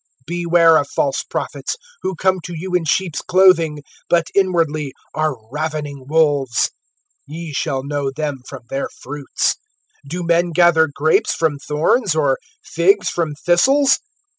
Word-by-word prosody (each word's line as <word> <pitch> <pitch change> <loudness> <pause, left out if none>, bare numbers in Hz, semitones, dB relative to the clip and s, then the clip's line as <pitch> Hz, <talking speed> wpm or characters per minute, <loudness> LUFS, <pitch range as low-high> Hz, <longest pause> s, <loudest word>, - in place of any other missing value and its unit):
(15)Beware 170 -1 +4
of 140 - -7
false 140 -1 0
prophets, - - -4 0.3
who 190 0 -3
come 185 +2 +1
to 175 - -6
you 180 +3 -6
in 180 -2 +2
sheeps' 165 0 0
clothing, 170 -5 +3 0.3
but 170 -1 +2
inwardly 165 -7 +1 0.2
are 155 -2 0 0.2
ravening 150 -2 -4
wolves. 145 -5 +2 0.6
(16)Ye 165 +1 -6
shall 140 -7 -1
know 140 -1 -2
them 145 -1 -4
from 135 -3 -9
their 135 - -2
fruits. 140 +1 -2 0.5
Do 175 +5 -4
men 170 0 +1
gather 160 -2 +4
grapes 155 +3 +1
from 155 -3 0
thorns, 155 - +1
or 140 -4 +1 0.2
figs 190 +5 +2
from 160 -4 -2
thistles? 270 +11 +4
160 Hz, 140 wpm, -19 LUFS, 145-175 Hz, 0.6 s, 15)Beware